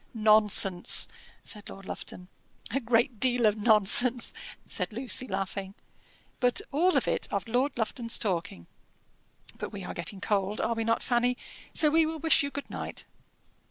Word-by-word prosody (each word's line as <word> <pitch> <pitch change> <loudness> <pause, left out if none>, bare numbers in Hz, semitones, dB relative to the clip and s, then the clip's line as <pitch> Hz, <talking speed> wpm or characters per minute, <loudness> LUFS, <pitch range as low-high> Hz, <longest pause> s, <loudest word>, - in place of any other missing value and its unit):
"Nonsense," 210 -4 +4 0.4
said 210 -2 -7
Lord 195 0 -11
Lufton. 180 -1 -8 0.4
"A 270 - 0
great 235 -1 +1
deal 245 -1 +3
of 210 -1 +3
nonsense," 220 +3 +3 0.3
said - - -2
Lucy, 255 +3 0
laughing, 195 -1 -4 0.6
"but 245 -1 +3
all 345 +6 +3
of - - +1
it - - 0
of - - -3
Lord 255 +4 0
Lufton's 230 +1 0
talking. 170 - -3 0.9
But - - -5
we 200 -2 -8
are - - -6
getting 170 +4 -4
cold 200 +1 -1
are 230 - 0
we 225 0 -3
not, 230 0 0
Fanny? 245 0 +1 0.3
so 305 -3 +4
we 320 0 +3
will 320 0 -4
wish 320 +1 +4
you 280 - -2
good 280 0 -7
night." - - -5
230 Hz, 160 wpm, -28 LUFS, 205-255 Hz, 0.9 s, Nonsense